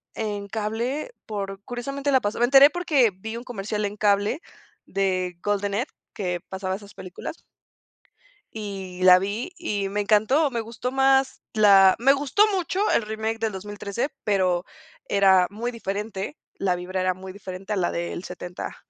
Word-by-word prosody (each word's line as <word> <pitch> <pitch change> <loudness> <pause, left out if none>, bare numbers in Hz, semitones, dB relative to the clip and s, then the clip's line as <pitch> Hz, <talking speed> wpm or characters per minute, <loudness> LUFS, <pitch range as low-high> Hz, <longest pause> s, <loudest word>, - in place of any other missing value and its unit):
en 205 -2 -3
cable 225 - -2 0.2
por 195 -2 -4
curiosamente 275 +4 -3
la 260 -1 +4
pasó 205 -1 -2
Me 240 - +5
enteré 270 +3 +8
porque, 295 -9 +3
vi 220 +5 -6
un 235 - -7
comercial 210 -2 -3
en 205 +1 -4
cable, 205 +7 +2 0.5
de 185 -2 -1
Golden 205 -1 0
Edge, 240 +7 -1 0.2
que 180 -3 -3
pasaba 190 0 -3
esas 205 0 -12
películas. 185 - -8 1.1
Y 195 -4 -6
la 185 0 +8
vi 205 - -3
y 205 - -2
me 205 +1 -1
encantó. 220 +9 +3
Me 235 -2 -1
gustó 230 +3 -5
más, 270 0 +3
la 195 -3 +7
Me 270 +4 +5
gustó 285 +8 +3
mucho 380 +3 0
el - - +3
remake 220 +1 -3
en - - -17
del 225 -1 0
2013 205 +5 -4
pero 185 -3 +1 0.4
era 190 -2 +5
muy 230 +4 -4
diferente. 210 +2 -4 0.2
La 185 -2 +1
vibra 185 +1 -3
era 185 0 +2
muy 185 +1 -9
diferente 195 +1 -6
a - - 0
la 180 -3 0
del 170 +1 -4
70 180 0 -7
205 Hz, 165 wpm, -25 LUFS, 190-240 Hz, 1.1 s, enteré